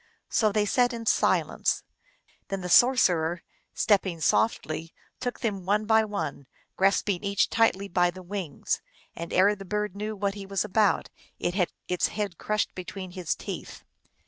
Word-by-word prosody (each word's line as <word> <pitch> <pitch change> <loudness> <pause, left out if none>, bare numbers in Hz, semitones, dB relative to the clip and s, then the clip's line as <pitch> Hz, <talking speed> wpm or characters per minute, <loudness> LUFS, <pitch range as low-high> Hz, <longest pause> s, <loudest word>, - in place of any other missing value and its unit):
So 215 -2 +3
they 210 0 +2
sat 245 +4 +2
in 230 -1 -6
silence. - - +1 0.6
Then 195 -1 -3
the 180 - -5
sorcerer, 175 -8 +4 0.3
stepping 190 -5 +2
softly, 160 -2 0 0.2
took 245 -1 -4
them 205 -6 -2
one 205 +3 +1
by 220 0 +4
one, 145 -10 -4 0.3
grasping 195 0 +2
each 200 0 +1
tightly 200 -4 +2
by 175 -1 +2
the 185 +1 -9
wings, 180 -5 -3 0.3
and 170 0 -6
ere 200 +3 +4
the 195 - -9
bird 210 0 -2
knew 210 +1 -4
what 200 0 -1
he 200 -1 -8
was 195 +1 0
about 210 0 +2 0.3
it 175 - -1
had 180 -2 +1 0.2
its 180 -1 +1
head 205 -5 -4
crushed 215 0 -1
between 185 0 -7
his 180 -3 -2
teeth. - - -7
195 Hz, 160 wpm, -27 LUFS, 180-210 Hz, 0.6 s, sorcerer